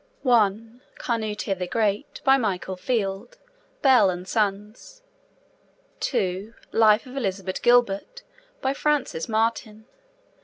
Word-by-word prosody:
(1) 225 -1 +1 0.2
Canute 215 -4 -2
the 180 - -3
Great. 215 +4 -1
By 270 0 +6
Michael 195 -6 -2
Field. 200 - -3 0.5
(Bell 255 -8 +6
and 180 0 -5
Sons.) 210 - -3 1.0
(2) 195 +5 -2 0.2
Life 220 +1 +4
of 255 +1 -11
Elizabeth 195 -6 -3
Gilbert. 245 - +2 0.4
By 265 +1 0
Frances 280 - -1
Martin. 220 -1 -1
220 Hz, 105 wpm, -24 LUFS, 195-250 Hz, 1.0 s, By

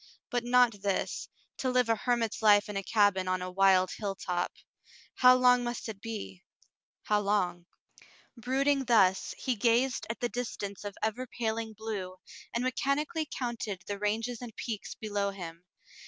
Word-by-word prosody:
But 245 -2 0
not 245 -4 +3
this, 195 -1 -1 0.3
to 260 - -1
live 250 -1 +3
a 225 - +3
hermit's 230 0 -1
life 205 -1 +6
in 210 - -6
a 195 - 0
cabin 200 -2 +2
on 185 0 0
a 185 - -5
wild 190 -1 +4
hilltop. 190 -4 -2 0.6
How 255 0 +7
long 250 -1 +5
must 240 0 -4
it 210 -3 -7
be 95 - -6 0.3
— - - -67
how 210 -1 +2
long? 180 -4 0 0.7
Brooding 270 +3 +1
thus, 195 -6 +3
he 255 - -1
gazed 235 +3 +2
at 230 - -4
the 240 - 0
distance 220 -5 -5
of 205 -1 -6
ever 220 +4 -1
paling 225 -1 -3
blue, 205 -4 -5 0.4
and 235 - -1
mechanically 295 +5 -1
counted 225 -7 -4
the 205 -1 -4
ranges 225 +3 -1
and 235 -3 -8
peaks 220 -4 -5
below 205 -2 -2
him. 175 -3 -8
220 Hz, 160 wpm, -30 LUFS, 195-245 Hz, 0.7 s, How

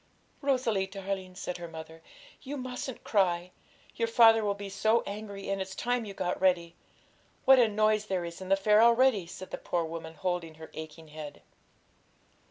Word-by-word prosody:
'Rosalie, 250 -8 +1
darling,' 190 -1 -5
said 180 -1 -4
her 175 -1 -7
mother, 160 0 -10 0.4
'you 285 +2 -6
mustn't 255 0 -5
cry; 180 -3 +1 0.4
your 230 - 0
father 225 -1 +6
will 200 -1 0
be 200 0 -7
so 215 +4 +2
angry, 200 -1 -6
and 195 -1 -1
it's 190 0 -5
time 245 +1 -1
you 200 - -7
got 180 -1 -2
ready. 175 -3 +2 0.7
What 265 -1 +8
a 240 - +6
noise 215 0 +2
there 185 -3 -1
is 170 +2 -8
in 185 - -7
the 195 - +6
fair 210 +2 +4
already!' 235 -5 +4
said 185 +1 -9
the - - -4
poor 170 -2 -1
woman, 160 0 -7
holding 175 -3 -3
her 160 0 -11
aching 155 0 -9
head. 150 -1 -9
195 Hz, 180 wpm, -30 LUFS, 175-220 Hz, 0.7 s, What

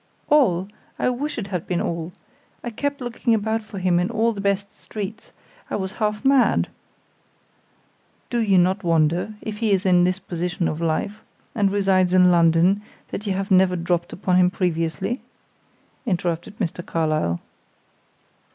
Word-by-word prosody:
"All! 195 - +4 0.3
I - - +1
wish 285 +4 -3
it 205 -4 -4
had 180 -4 -3
been 175 -2 0
all. 170 0 -3 0.5
I 240 - -4
kept 285 +4 -3
looking 240 -1 0
about 220 +1 -1
for 215 -1 -10
him 180 -2 +2
in 180 - 0
all 230 0 +1
the 200 - -5
best 200 0 -1
streets; 215 +1 -7 0.4
I - - -2
was 190 -2 -3
half 210 +3 -1
mad 270 -2 +4 0.8
" - - -39
"Do 240 - +1
you 200 -4 +3
not 185 +3 +2
wonder, 170 +4 +1
if 210 -1 -5
he 225 -2 +1
is 195 0 +2
in 180 -2 +5
this 185 +1 +2
position 175 -2 -2
of 155 +2 -3
life, 170 +6 -1 0.3
and 205 -3 +2
resides 190 -2 +2
in 180 -1 +6
London, 170 +3 +4 0.3
that 210 - -5
you 195 - +1
have 195 +1 -3
never 185 -1 +5
dropped 175 0 -1
upon 185 -1 +1
him 180 0 +5
previously?" 180 - -1 0.9
interrupted 175 0 -2
Mr. 175 -3 -3
Carlyle. 155 - 0
190 Hz, 160 wpm, -23 LUFS, 175-210 Hz, 0.9 s, in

